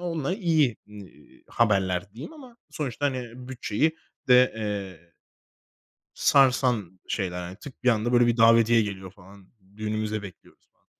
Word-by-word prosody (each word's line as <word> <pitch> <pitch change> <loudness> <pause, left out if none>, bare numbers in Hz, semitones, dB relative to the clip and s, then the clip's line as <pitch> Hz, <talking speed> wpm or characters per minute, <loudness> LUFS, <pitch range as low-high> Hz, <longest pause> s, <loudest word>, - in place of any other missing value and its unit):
onunla 170 -1 -2
iyi, 160 - +1
iii, 100 -8 -15
haberler 95 -4 0
diyeyim 125 - -9
ama 260 -7 -14
sonuçta, 145 -2 -3
hani, 125 -1 -6
bütçeyi 130 +5 -1 0.3
de, 125 0 +6
eee 95 -6 -6 1.0
sarsan 125 -9 +2
şeyler, 90 -4 -3
hani, 90 +2 -8
tık, 130 +4 -13
bir 125 - +4
anda 115 +1 0
böyle 120 -1 +5
bir 120 0 +1
davetiye 115 0 +5
geliyor, 95 -3 -6
falan, 95 0 -18 0.3
"Düğünümüze 110 0 -3
bekliyoruz." 95 -4 -14
falan, - - -43
115 Hz, 135 wpm, -25 LUFS, 100-130 Hz, 1.0 s, de